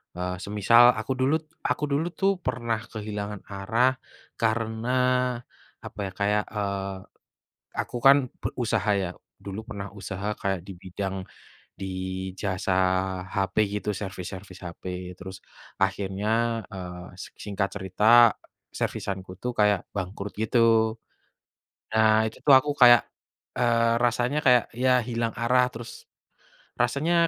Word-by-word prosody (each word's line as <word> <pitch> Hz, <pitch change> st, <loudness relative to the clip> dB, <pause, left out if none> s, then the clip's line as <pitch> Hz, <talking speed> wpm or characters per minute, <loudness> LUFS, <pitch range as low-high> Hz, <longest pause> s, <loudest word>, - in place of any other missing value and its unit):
eee, 90 Hz, +1 st, -3 dB
semisal 105 Hz, +3 st, +5 dB, 0.2 s
aku -, -, -4 dB
dulu 130 Hz, +3 st, +2 dB
t -, -, -35 dB, 0.2 s
aku -, -, -1 dB
dulu 145 Hz, +4 st, +1 dB
tuh 195 Hz, 0 st, +4 dB
pernah 115 Hz, -3 st, -1 dB
kehilangan 105 Hz, -2 st, -5 dB
arah 110 Hz, +6 st, +2 dB, 0.5 s
karena 110 Hz, +1 st, -1 dB, 1.0 s
apa -, -, -9 dB
ya, -, -, -7 dB
kayak, 105 Hz, +1 st, +2 dB
eee, 100 Hz, -1 st, -2 dB, 0.8 s
aku -, -, -5 dB
kan 140 Hz, +1 st, +10 dB, 0.3 s
pe -, -, 0 dB
usaha 110 Hz, -4 st, 0 dB
ya, 90 Hz, -, -3 dB, 0.3 s
dulu 100 Hz, 0 st, -6 dB
pernah 100 Hz, -5 st, -6 dB
usaha 100 Hz, 0 st, -5 dB
kayak 95 Hz, -2 st, 0 dB
di 100 Hz, -, -7 dB
bidang 95 Hz, +1 st, -4 dB, 0.6 s
di 95 Hz, -, -5 dB, 0.5 s
jasa 95 Hz, -1 st, -1 dB, 0.6 s
HP 95 Hz, 0 st, -1 dB, 0.2 s
gitu, 105 Hz, -, -2 dB
servis-servis 95 Hz, -1 st, -7 dB
HP, 85 Hz, -1 st, -9 dB, 0.3 s
terus 95 Hz, -1 st, -8 dB, 0.5 s
akhirnya, 95 Hz, +1 st, -1 dB, 0.4 s
eee, 90 Hz, -2 st, -7 dB, 0.2 s
sek -, -, -11 dB
singkat 100 Hz, -1 st, -1 dB
cerita 95 Hz, +1 st, -2 dB, 0.7 s
servisan 95 Hz, -1 st, -3 dB
ku 90 Hz, -, -10 dB
tuh 125 Hz, +6 st, -4 dB
kayak 105 Hz, -2 st, +3 dB
bangkrut 100 Hz, +1 st, -5 dB
gitu. 110 Hz, 0 st, +3 dB, 1.0 s
Nah 110 Hz, 0 st, +4 dB
itu 110 Hz, -, -7 dB
tuh 140 Hz, -, +9 dB
aku 130 Hz, +3 st, +3 dB
kayak, 120 Hz, -2 st, +9 dB, 0.6 s
eee, 115 Hz, -1 st, +3 dB
rasanya 120 Hz, +4 st, +1 dB
kayak 125 Hz, -2 st, +6 dB, 0.2 s
ya 130 Hz, -, +4 dB, 0.2 s
hilang 115 Hz, -1 st, -1 dB
arah, 125 Hz, +2 st, +3 dB
terus 115 Hz, 0 st, -8 dB, 0.9 s
rasanya 140 Hz, +8 st, +1 dB
105 Hz, 130 wpm, -26 LUFS, 95-120 Hz, 1.0 s, kan